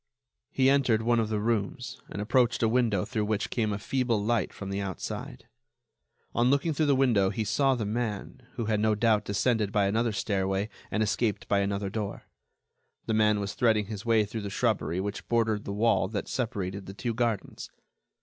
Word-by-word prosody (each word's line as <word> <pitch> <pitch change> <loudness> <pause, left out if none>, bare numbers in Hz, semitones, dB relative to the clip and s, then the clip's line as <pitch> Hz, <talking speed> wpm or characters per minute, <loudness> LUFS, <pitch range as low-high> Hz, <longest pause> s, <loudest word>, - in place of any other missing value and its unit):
He 130 -1 +2
entered, 130 -5 +3
one 120 0 +3
of 110 -1 0
the 110 -1 0
rooms 115 +3 -2
and 100 - -4
approached 120 +1 +2
a - - +5
window 115 -5 +2
through 105 -1 -2
which 105 -1 -1
came 110 -4 0
a 100 - -1
feeble 120 +1 0
light 110 +2 0
from 100 -1 -7
the 100 +1 -2
outside. 95 -2 -6 0.9
On 120 +1 +3
looking 140 +4 +2
through 150 +1 +1
the 140 - +4
window 115 -8 +3
he 110 +2 -2
saw 135 +5 +2
the 115 -4 -2
man, 110 +2 -3
who 115 - -3
had 105 -1 +1
no 110 0 +2
doubt 110 -1 +2
descended 105 0 +1
by 100 -1 +2
another 115 +4 +1
stairway 95 -1 -1 0.2
and 110 - 0
escaped 110 0 -1
by 100 - +2
another 100 0 -1
door. 105 -2 -4 0.8
The 110 - -1
man 105 -1 +3
was 100 -2 -3
threading 110 -3 +2
his 105 -1 -6
way 115 -2 +3
through 110 +2 -5
the 100 - -4
shrubbery 105 -5 0
which 100 +1 -4
bordered 110 -3 +1
the - - -4
wall 105 -1 +2
that 105 0 -4
separated 100 -6 -3
the 95 - -8
two 120 +2 -2
gardens. 115 -3 -2
110 Hz, 195 wpm, -28 LUFS, 100-120 Hz, 0.9 s, a